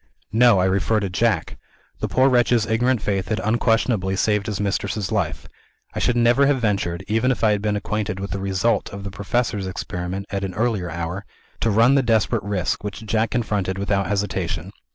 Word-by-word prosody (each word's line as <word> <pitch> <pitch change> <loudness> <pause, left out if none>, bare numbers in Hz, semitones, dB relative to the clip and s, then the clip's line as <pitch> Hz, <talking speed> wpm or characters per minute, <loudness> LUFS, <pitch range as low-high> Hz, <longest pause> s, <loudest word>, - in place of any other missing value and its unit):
"No; 115 -1 +5
I 90 - +3
refer 100 +3 +1
to 100 -3 -3
Jack. - - 0 0.4
The - - -1
poor 130 +1 +3
wretch's 120 -3 +3
ignorant 120 +1 +1
faith 100 -2 -1
had 110 -1 -1
unquestionably 115 -3 +1
saved 105 +1 +1
his 105 -3 -3
mistress's 100 0 -2
life. 100 -7 -2 0.5
I - - -3
should 120 - +1
never 120 +3 +4
have 140 -2 +2
ventured 100 -6 -1
(even 115 +4 +1
if 120 -4 -1
I 110 - +5
had 105 -1 0
been 105 0 0
acquainted 105 -1 -2
with 100 0 -5
the 100 - -3
result 95 +4 0
of 100 -1 -7
the 100 - -5
Professor's 100 0 -1
experiment, 90 +1 -4
at 100 -1 -2
an 95 -2 -4
earlier 110 -6 0
hour) 85 +4 -4 0.4
to 115 - +1
run 115 +5 +5
the 140 - +4
desperate 115 -2 +1
risk, 100 -4 -2
which 105 +2 -6
Jack 110 +1 +1
confronted 105 -6 -1
without 100 0 0
hesitation. 95 -4 -2
105 Hz, 195 wpm, -22 LUFS, 95-115 Hz, 0.5 s, No